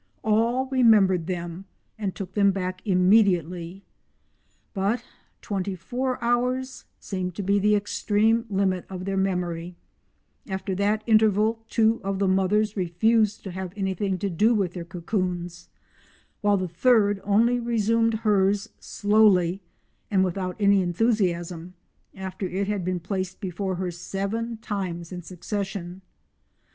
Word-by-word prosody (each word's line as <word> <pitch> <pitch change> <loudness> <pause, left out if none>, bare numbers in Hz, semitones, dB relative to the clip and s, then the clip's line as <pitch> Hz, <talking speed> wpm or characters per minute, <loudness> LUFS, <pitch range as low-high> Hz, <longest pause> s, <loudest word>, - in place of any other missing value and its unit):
All 230 +4 +2
remembered 205 -9 +4
them 175 0 -5 0.3
and 200 -4 -4
took 195 -4 -7
them 200 -1 +4
back 185 -1 -4
immediately. 180 -2 +2 0.9
But 200 +4 0 0.4
twenty 195 -1 -2
four 250 +8 -3
hours 250 +2 -1
seemed 185 -3 -4
to 205 - -4
be 200 +2 +2
the 210 +1 +3
extreme 215 +3 +1
limit 190 -2 0
of 185 -1 -6
their 195 0 -2
memory; 180 -2 -2 0.7
after 190 -1 -3
that 205 +3 0
interval 220 0 +3
two 225 0 +2
of 195 0 -2
the 195 0 +1
mothers 195 +3 +2
refused 210 +4 +1
to 195 - -6
have 185 0 -6
anything 190 -1 -1
to 200 +2 -2
do 215 +8 +3
with 190 -5 0
their 175 -2 -6
cocoons, 175 0 -4 0.7
while 205 -1 +3
the 185 -1 -2
third 205 +2 +3
only 230 +5 +3
resumed 230 -1 +1
hers, 205 0 +2
slowly 205 -3 +3 0.5
and 190 -2 +3
without 185 0 -2
any 200 -1 +4
enthusiasm, 180 -3 -1 0.4
after 190 0 -5
it 195 +2 -2
had 205 -3 -1
been 180 0 -1
placed 185 +1 -4
before 190 -1 -3
her 180 0 -3
seven 200 +6 -4
times 185 -6 -4
in 180 -1 -6
succession. 185 0 -5
195 Hz, 130 wpm, -25 LUFS, 185-215 Hz, 0.9 s, remembered